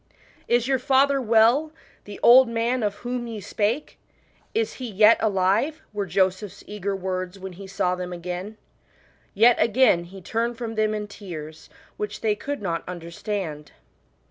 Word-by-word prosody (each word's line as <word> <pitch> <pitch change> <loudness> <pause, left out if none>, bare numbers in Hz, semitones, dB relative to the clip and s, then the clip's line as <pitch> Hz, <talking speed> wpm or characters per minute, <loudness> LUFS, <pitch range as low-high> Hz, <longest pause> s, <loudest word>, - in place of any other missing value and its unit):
" - - -30
Is 240 0 -3
your 265 -1 +2
father 275 +1 +3
well, 235 +6 +4 0.3
the 205 -1 -9
old 250 +1 +8
man 230 +2 0
of 205 -2 -1
whom 245 -1 -3
ye 225 -2 -6
spake? 215 +7 -2 0.5
Is 450 0 -1
he 250 - -4
yet 210 +2 +6
alive? 210 +9 +1
" - - -40
were 205 -1 -2
Joseph's 190 +2 -1
eager 200 -1 -3
words 185 0 -4
when 190 -1 -8
he 195 +2 -10
saw 185 -1 0
them 180 0 -5
again. 180 +4 -6 0.8
Yet 230 +4 +6
again 230 -7 +4
he 190 +3 -11
turned 230 +5 -2
from 230 -2 -4
them 215 -1 0
in 210 0 -4
tears, 160 -7 -9 0.3
which 210 0 -5
they 220 -2 +2
could 285 +1 -5
not 170 -3 -2
understand. 170 -2 -5
210 Hz, 165 wpm, -24 LUFS, 185-235 Hz, 0.8 s, old